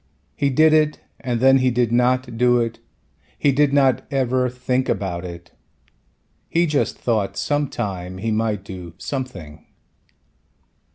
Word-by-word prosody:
He 140 - +1
did 155 +4 +4
it 155 -1 +2 0.2
and 120 -3 -2
then 135 +2 +5
he 130 0 +3
did 120 -2 +1
not 125 0 +1
do 125 +1 +3
it, 115 -1 -2 0.6
he 145 - +3
did 145 +1 +3
not 135 -3 +3
ever 130 -2 +1
think 125 +1 -1
about 95 -3 -2
it. 85 -1 -9 1.0
He 170 +1 +2
just 150 -3 0
thought 110 -5 -1
some 145 0 0
time 95 -8 -5
he 110 +4 -2
might 110 -2 -1
do 90 -4 -9
something. 95 - -6
125 Hz, 145 wpm, -21 LUFS, 100-135 Hz, 1.0 s, then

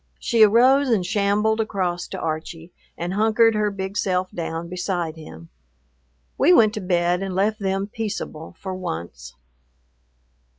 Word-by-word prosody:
She 230 -2 +1
arose 255 +6 +5
and 210 -6 +1
shambled 210 +3 +1
across 185 -5 -2
to 190 - -7
Archie 165 +1 -5 0.2
and 175 +2 -3
hunkered 225 +2 +3
her 210 -1 +1
big 195 0 -5
self 185 -2 -1
down 165 0 -4
beside 175 -2 -3
him. 85 - -12 0.9
We 305 - +5
went 215 -9 +5
to 215 - -4
bed 175 0 +1
and 190 -2 -4
left 210 +3 +1
them 195 0 -1
peaceable 200 -7 -6
for 190 -1 -5
once. 80 - -6
190 Hz, 140 wpm, -22 LUFS, 175-215 Hz, 0.9 s, arose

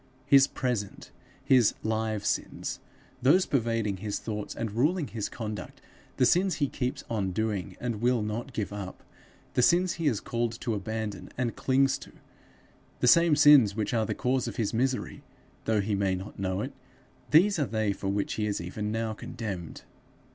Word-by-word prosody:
His 135 -1 +6
present, 120 -9 -3 0.3
his 125 -5 +4
live 110 -1 -1
sins - - -2 0.4
those 160 +9 +5
pervading 115 -6 0
his 105 +1 -3
thoughts 105 -2 -5
and 115 -2 -3
ruling 150 - +1
his 110 -3 -3
conduct; 110 -2 -6 0.4
the 130 - +4
sins 180 +8 +3
he 145 - +1
keeps 125 -1 -3 0.3
doing, 105 -5 -2
and 120 -3 -3
will 120 -2 +2
not 115 +5 -4
give 105 -4 -3
up; 100 -2 -7 0.5
the - - +2
sins 175 +6 +4
he 160 - +1
is 115 -8 +1
called 115 -1 -2
to 115 - -1
abandon, 105 -1 -4
and 125 -2 -1
clings 135 +1 +2
to; - - -13 0.9
the - - +2
same 170 +3 +6
sins 145 -9 +7
which 110 +1 -2
are 110 -2 +1
the - - -2
cause 125 0 0
of - - -5
his 110 -2 -1
misery, 130 +3 -1 0.4
though 110 -2 +2
he 105 +1 -2
may 100 -1 +1
not 95 +2 -8
know 95 0 -1
it 135 +5 -5 0.6
these 175 - +5
are 145 - +1
they 110 -2 0
for 95 - -6
which 100 +1 -1
he 105 -1 -1
is 100 - -1
even 105 +5 -4
now 110 0 -1
condemned. 100 -7 -6
115 Hz, 175 wpm, -28 LUFS, 105-130 Hz, 0.9 s, sins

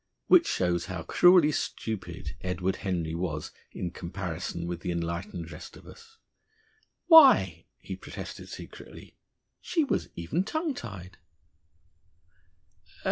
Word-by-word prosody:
Which 345 -2 +6
shows 90 -1 0
how 90 -3 -5
cruelly 175 - +6
stupid 90 - -4
Edward 90 +1 -1
Henry 85 -5 -2
was 85 -3 -3 0.2
in 90 - -4
comparison 85 -2 -5
with 85 0 -4
the 90 - -4
enlightened 85 0 -4
rest 75 - -10
of - - -16
us. 455 -1 -15 0.9
Why 320 -6 +7
(he - - -7
protested - - -9
secretly), - - -11 0.4
she 335 -3 0
was 280 - -1
even 115 - -1
tongue 315 - -2
tied! 95 - -9
90 Hz, 115 wpm, -28 LUFS, -, 0.9 s, Why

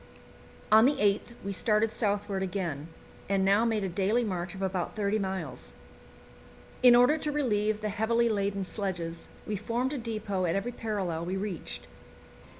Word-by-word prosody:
On 220 +2 +8
the 290 - +2
8th 210 0 +1
we 200 - -2
started 215 +2 +2
southward 205 -3 -1
again, 175 -6 -3 0.4
and 195 -1 +2
now 200 +4 +4
made 220 -3 0
a - - 0
daily 200 +6 +1
march 180 -3 -3
of 195 - -5
about 185 -2 -2
thirty 210 0 0
miles. 185 -10 -4 1.1
In 250 -1 +8
order 250 +6 +5
to 300 - -2
relieve 215 -7 0
the 215 - -1
heavily 230 +3 +1
laden 200 -2 0
sledges, 180 -4 -4 0.2
we 215 - -2
formed 240 +7 -1
a 285 - -3
depot 215 -5 -2
at 165 - 0
every 195 +5 -1
parallel 200 -8 -3
we 185 +2 -2
reached. 195 -3 -5
205 Hz, 160 wpm, -29 LUFS, 190-225 Hz, 1.1 s, On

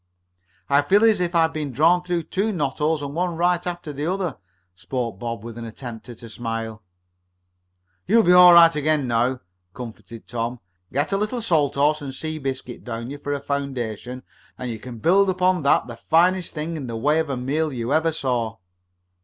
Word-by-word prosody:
"I 140 0 +4
feel 195 +9 +3
as 220 -3 +5
if 175 -1 -1
I 165 - +5
had 160 0 0
been 150 -3 -3
drawn 165 +7 +4
through 175 -1 -2
two 200 +7 -1
knot 145 -8 -2
holes, 150 0 +1
one 170 +5 -2
right 175 +1 +1
after 175 -4 -5
the 145 +3 -3
other," 180 -5 -2 0.3
spoke 115 +1 -4
Bob, 115 -1 -5
with 115 0 -8
an - - -6
attempt 115 +1 -9
at 120 -1 -11
a 115 - -9
smile. 115 -2 -5 1.3
"You'll 225 +4 +5
soon - - -2
be - - +7
all 180 0 +9
right 170 -1 +8
again 150 -2 +1
now," 120 +2 +1 0.3
comforted 115 -1 -9
Tom. 120 +1 -4 0.3
"Get 145 +7 -1
a 195 - +2
little 215 +4 -2
salt 150 -8 +1
horse 150 +2 +2
and 135 -2 -6
sea 155 +1 -4
biscuit 135 -3 -5
down 120 +3 -5
for 145 - -4
a 140 - -2
foundation, 130 -3 -4 0.3
and 125 -1 -4
you 110 - -6
can 125 +1 -9
build 190 - +3
up 185 0 -2
on 185 -2 +3
that 140 -4 +3
the 120 -1 -9
finest 175 +6 +2
thing 160 +2 -3
in 135 -4 -6
the 115 -1 -4
way 150 +7 +2
of 160 -2 -1
a 135 - -2
meal 150 +5 -1
you 120 +1 -2
ever 160 +1 +2
saw." 125 -7 -2
145 Hz, 205 wpm, -23 LUFS, 120-170 Hz, 1.3 s, all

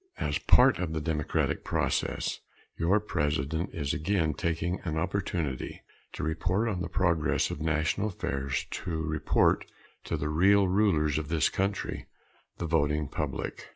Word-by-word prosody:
As - - -1
part 125 -3 +5
of 85 -3 -2
the 80 - -1
democratic 75 -2 -1
process, - - -1 0.4
your 90 +6 +3
President 80 -2 -1
is 70 -4 -2
again 80 -1 +1
taking 85 +3 -1
an 80 -3 -2
opportunity 85 -6 -2 0.3
to - - -5
report 90 +8 0
on 95 -5 -1
the 85 - -3
progress 85 -5 +1
of 75 - -5
national 80 +6 +1
affairs, 70 -8 -2
to 80 -2 -3
report 80 -1 +2 0.4
to - - -1
the 75 - -2
real 95 +5 +4
rulers 90 -7 +2
of 75 - -5
this 80 0 +2
country 100 +1 -2 0.5
the 85 - -3
voting 75 -2 +1
public. - - -4
80 Hz, 145 wpm, -29 LUFS, 75-95 Hz, 0.5 s, part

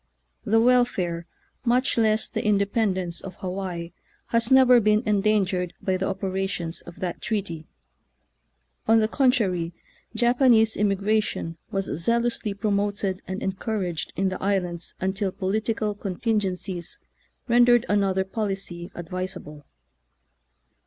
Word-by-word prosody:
The 225 +1 +4
welfare, 225 -9 +2 0.4
much 250 +2 +2
less 220 -1 +2
the - - -3
inde 200 -1 +2
pendence, 185 -6 0
of 190 -2 -8
Hawaii 180 -2 -4 0.4
has 230 +2 +1
never 255 -2 +7
been 215 +1 +3
en 210 -2 +2
dangered 190 -4 +1
by 190 - 0
the 190 +1 -1
operations 190 -3 -2
of 170 +1 -12
that 180 -2 -3
treaty. 195 -8 -3 1.2
On 225 +1 +6
the 215 -1 +3
contrary, 205 -10 +1 0.4
Japanese 240 -2 +4
immigration 200 -4 0
was 195 -3 -1
zealously 230 +3 -1
promoted 200 -1 -1
and 190 +1 -4
encouraged 190 -3 -2
in 190 +2 +1
the 185 - -5
islands 180 -3 -1
until 190 +1 -1
political 215 +3 -1
contingen 205 0 -1
cies 180 -2 -4 0.5
rendered 240 -1 +5
another 195 -2 +2
policy 195 -4 -4
advisable. 175 -4 -6
195 Hz, 120 wpm, -25 LUFS, 185-220 Hz, 1.2 s, never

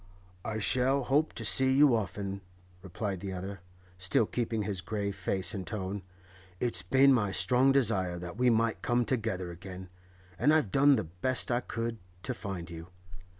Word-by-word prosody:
'I 110 -1 -3
shall 130 +5 +2
hope 145 +5 +1
to 115 - -5
see 130 +4 +7
you 140 -2 +5
often,' 100 -2 -4 0.4
replied 95 +1 -4
the 95 +1 -6
other, 95 +2 -6 0.4
still 95 +4 +2
keeping 115 -1 -2
his 100 -3 -3
grave 100 +1 -3
face 95 +1 0
and 95 -4 -6
tone. 100 0 -4 0.6
'It's 115 -7 0
been 135 +9 +4
my 105 -6 +1
strong 130 +6 +3
desire 100 -10 +1
that 85 +1 -7
we 125 +2 +2
might 115 -1 +1
come 120 0 +1
together 105 -8 -2
again, 95 +1 -9 0.5
and 150 +1 +4
I've 150 -11 +1
done 140 +1 +5
the - - -1
best 90 +12 0
I 120 - +2
could 115 -2 -4 0.2
to - - -1
find 95 -4 -6
you. 85 0 -9
105 Hz, 170 wpm, -30 LUFS, 95-125 Hz, 0.6 s, see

